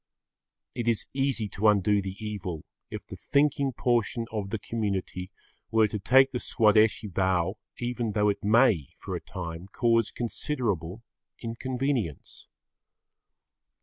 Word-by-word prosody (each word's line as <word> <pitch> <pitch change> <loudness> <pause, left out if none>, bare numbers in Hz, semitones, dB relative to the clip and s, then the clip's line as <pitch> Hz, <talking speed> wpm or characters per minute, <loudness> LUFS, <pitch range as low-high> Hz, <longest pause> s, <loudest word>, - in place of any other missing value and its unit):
It 120 -2 -3
is 115 -2 +2
easy 135 -5 0
to 100 +4 +1
undo 105 0 +4
the 95 -1 -5
evil 100 -7 -5 0.3
if - - -7
the - - -9
thinking 140 -1 +1
portion 120 -2 0
of 105 -3 -3
the 110 - -2
community 100 -4 -3 0.4
were 110 -1 +4
to 105 - -3
take 135 +6 +5
the 125 - -2
Swadeshi 110 -1 +3
vow 95 0 0 0.2
even 120 -2 -2
though 105 0 +2
it 100 0 -2
may, 110 - +4
for - - -5
a - - -4
time, 85 0 -7
cause 115 +1 +2
considerable 115 - -3 0.4
inconvenience. 125 - -3
110 Hz, 130 wpm, -28 LUFS, 95-120 Hz, 0.4 s, take